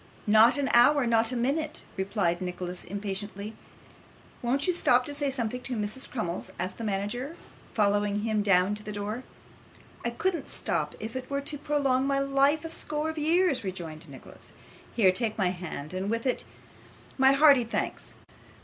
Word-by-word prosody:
'Not 220 Hz, +4 st, +6 dB
an 280 Hz, -1 st, 0 dB
hour 255 Hz, +3 st, +6 dB
not 230 Hz, 0 st, +2 dB
a -, -, -3 dB
minute,' 285 Hz, +6 st, -1 dB
replied 190 Hz, -3 st, 0 dB
Nicholas, 180 Hz, 0 st, -4 dB
impatiently. 200 Hz, +1 st, -4 dB, 0.9 s
'Won't 265 Hz, +4 st, 0 dB
you 365 Hz, -, +2 dB
stop 250 Hz, -7 st, +3 dB
to 290 Hz, -, -4 dB
say 285 Hz, -1 st, -1 dB
something 250 Hz, -2 st, -3 dB
to 255 Hz, 0 st, -3 dB
Mrs. 215 Hz, +4 st, -2 dB
Crummles?' 180 Hz, -8 st, -4 dB
asked 185 Hz, -, -4 dB
the -, -, -4 dB
manager, 220 Hz, +9 st, -3 dB, 0.3 s
following 205 Hz, -1 st, +1 dB
him 215 Hz, -1 st, 0 dB
down 195 Hz, -1 st, +3 dB
to 210 Hz, -, -5 dB
the 210 Hz, -, -7 dB
door. 210 Hz, +4 st, -4 dB, 0.8 s
'I 235 Hz, -, 0 dB
couldn't 330 Hz, +5 st, -1 dB
stop -, -, -2 dB
if 220 Hz, +2 st, -6 dB
it 260 Hz, -1 st, -5 dB
were 280 Hz, 0 st, -1 dB
to 290 Hz, +1 st, -4 dB
prolong 275 Hz, -2 st, +1 dB
my 275 Hz, 0 st, +1 dB
life 275 Hz, +3 st, +2 dB
a -, -, -4 dB
score 310 Hz, -1 st, -3 dB
of 315 Hz, -, -6 dB
years,' 330 Hz, -2 st, +2 dB
rejoined 170 Hz, -4 st, -6 dB
Nicholas. 135 Hz, -, -14 dB, 0.4 s
'Here, 195 Hz, -6 st, +5 dB
take 220 Hz, +2 st, -1 dB
my 190 Hz, -4 st, +2 dB
hand, 175 Hz, -4 st, -6 dB
and 190 Hz, +2 st, -2 dB
with 230 Hz, +2 st, -1 dB
it 255 Hz, -, 0 dB, 0.7 s
my 265 Hz, +1 st, +6 dB
hearty 280 Hz, -3 st, +6 dB
thanks. 230 Hz, -, -4 dB
230 Hz, 170 wpm, -28 LUFS, 200-275 Hz, 0.9 s, Not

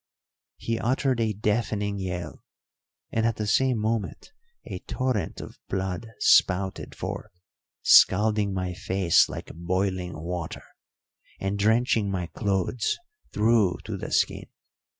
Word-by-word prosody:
He 115 Hz, 0 st, -2 dB
uttered 130 Hz, +1 st, +1 dB
a 110 Hz, -1 st, +1 dB
deafening 105 Hz, -1 st, -1 dB
yell, 90 Hz, -3 st, -5 dB, 0.7 s
and 110 Hz, -, 0 dB
at 115 Hz, -1 st, +1 dB
the 105 Hz, -, -3 dB
same 125 Hz, +4 st, +2 dB
moment 110 Hz, -, -2 dB, 0.3 s
a -, -, -6 dB
torrent 125 Hz, -10 st, -2 dB
of -, -, -10 dB
blood 95 Hz, +3 st, -3 dB
spouted 95 Hz, +1 st, +3 dB
forth, -, -, -5 dB, 0.5 s
scalding 105 Hz, +1 st, +5 dB
my 90 Hz, -1 st, -2 dB
face 95 Hz, -1 st, +3 dB
like -, -, -7 dB
boiling 90 Hz, +1 st, -2 dB
water, 85 Hz, 0 st, -5 dB, 0.8 s
and 95 Hz, +1 st, -2 dB
drenching 110 Hz, 0 st, +2 dB
my 95 Hz, -2 st, -2 dB
clothes 100 Hz, +6 st, -1 dB, 0.3 s
through 105 Hz, -4 st, +3 dB
to -, -, -4 dB
the -, -, -6 dB
skin. -, -, +1 dB
100 Hz, 120 wpm, -26 LUFS, 95-110 Hz, 0.8 s, scalding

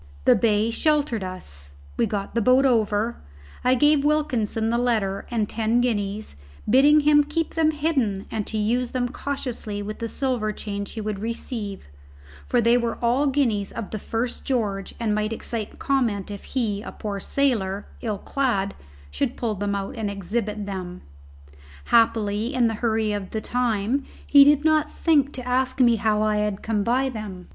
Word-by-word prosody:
The -, -, +7 dB
bay 220 Hz, 0 st, +2 dB
sheltered 290 Hz, -5 st, +1 dB
us; 70 Hz, -, -9 dB, 0.2 s
we -, -, +1 dB
got 200 Hz, -2 st, -4 dB
the 235 Hz, -, +1 dB
boat 255 Hz, +4 st, +4 dB
over; 225 Hz, -2 st, +1 dB, 0.5 s
I 255 Hz, +1 st, +4 dB
gave 295 Hz, +2 st, +4 dB
Wilkinson 250 Hz, -8 st, 0 dB
the 235 Hz, +1 st, +1 dB
letter 215 Hz, -6 st, 0 dB
and 225 Hz, -3 st, 0 dB
ten 225 Hz, +2 st, +1 dB
guineas, 215 Hz, -, -2 dB, 0.3 s
bidding 285 Hz, +6 st, +6 dB
him 295 Hz, 0 st, +5 dB
keep 305 Hz, +2 st, -2 dB
them 320 Hz, -1 st, +3 dB
hidden 280 Hz, -11 st, 0 dB
and 215 Hz, -2 st, -3 dB
to 220 Hz, -, -3 dB
use 235 Hz, +4 st, 0 dB
them 245 Hz, -1 st, 0 dB
cautiously 240 Hz, -6 st, -4 dB
with 210 Hz, +1 st, -6 dB
the 230 Hz, -, -2 dB
silver 240 Hz, -4 st, -1 dB
change 200 Hz, -1 st, -5 dB
he 220 Hz, -, -5 dB
would 210 Hz, -2 st, -3 dB
receive, 220 Hz, -2 st, -5 dB, 0.6 s
for 245 Hz, -, +2 dB
they 235 Hz, +1 st, +4 dB
were 235 Hz, -1 st, -2 dB
all 245 Hz, +5 st, +2 dB
guineas 240 Hz, -8 st, +1 dB
of 220 Hz, -, -6 dB
the 215 Hz, -, -4 dB
first 230 Hz, +4 st, -3 dB
George 205 Hz, -7 st, -2 dB
and 225 Hz, -3 st, 0 dB
might 215 Hz, +1 st, -1 dB
excite 225 Hz, -1 st, -5 dB
comment 230 Hz, -8 st, 0 dB
if 200 Hz, -, -8 dB
he, 220 Hz, -6 st, -1 dB
a -, -, -7 dB
poor 205 Hz, -2 st, -5 dB
sailor, 205 Hz, -6 st, 0 dB, 0.2 s
ill 215 Hz, -4 st, -2 dB
clad, 200 Hz, -5 st, -1 dB, 0.4 s
should 70 Hz, -, -2 dB
pull 230 Hz, -3 st, -1 dB
them 200 Hz, 0 st, -2 dB
out 195 Hz, -1 st, -4 dB
and 220 Hz, -2 st, -2 dB
exhibit 205 Hz, +2 st, -3 dB
them. 185 Hz, -2 st, -6 dB, 0.8 s
Happily, 225 Hz, +1 st, +2 dB
in 250 Hz, -2 st, +3 dB
the 225 Hz, -, +1 dB
hurry 220 Hz, -2 st, +1 dB
of 200 Hz, -2 st, -4 dB
the 220 Hz, -, -3 dB
time, 245 Hz, +2 st, 0 dB, 0.2 s
he 280 Hz, -1 st, +8 dB
did 290 Hz, +1 st, +4 dB
not 310 Hz, -1 st, +3 dB
think 290 Hz, -4 st, +2 dB
to 255 Hz, -2 st, -6 dB
ask 255 Hz, +1 st, 0 dB
me 240 Hz, -2 st, +5 dB
how 215 Hz, 0 st, +1 dB
I 215 Hz, 0 st, +1 dB
had 210 Hz, -1 st, -1 dB
come 220 Hz, -2 st, 0 dB
by 255 Hz, +5 st, +1 dB
them. 210 Hz, -7 st, -7 dB
225 Hz, 175 wpm, -24 LUFS, 205-255 Hz, 0.8 s, he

